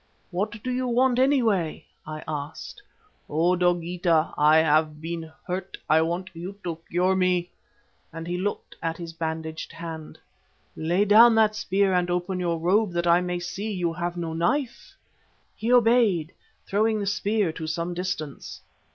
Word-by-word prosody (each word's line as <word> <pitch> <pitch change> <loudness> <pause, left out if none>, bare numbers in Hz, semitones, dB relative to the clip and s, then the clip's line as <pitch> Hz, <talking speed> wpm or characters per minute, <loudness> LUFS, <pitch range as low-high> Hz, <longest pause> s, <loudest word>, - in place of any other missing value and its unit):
"'What 205 +4 -3
do 255 - -2
you 255 0 -1
want, 250 +1 +2
anyway?' 230 - +2 0.2
I 155 0 -6
asked. 150 - -6 0.5
"'O! 170 +4 +2
Dogeetah, 175 -2 +1
I 150 +1 +5
have 155 -1 +2
been 165 0 -5
hurt, 185 +1 -4
I 155 +1 +5
want 175 +3 -2
you 175 +4 -7
to 165 -2 -4
cure 180 +2 +2
me,' 180 -1 +1 0.6
and 165 0 -7
he 175 +1 -3
looked 200 +3 -3
at 165 0 -2
his 170 -1 -7
bandaged 160 -1 -4
hand. 165 -2 -8 0.6
"'Lay 175 +6 +1
down 225 +3 +7
that 215 -1 +4
spear 195 -2 +1
and 180 -1 +1
open 180 +1 -1
your 170 -2 0
robe 185 +4 +2
that 170 0 -1
I 170 +1 +5
may 180 0 -2
see 180 +5 -4
you 175 -4 -1
have 175 +1 -3
no 165 -2 -3
knife.' 240 - -1 0.6
"He 230 +2 -2
obeyed, 225 -9 +4 0.3
throwing 215 +2 +1
the 200 - -2
spear 205 -2 0
to 160 0 -6
some 170 +2 -2
distance. 175 -5 -5
175 Hz, 160 wpm, -25 LUFS, 165-205 Hz, 0.6 s, down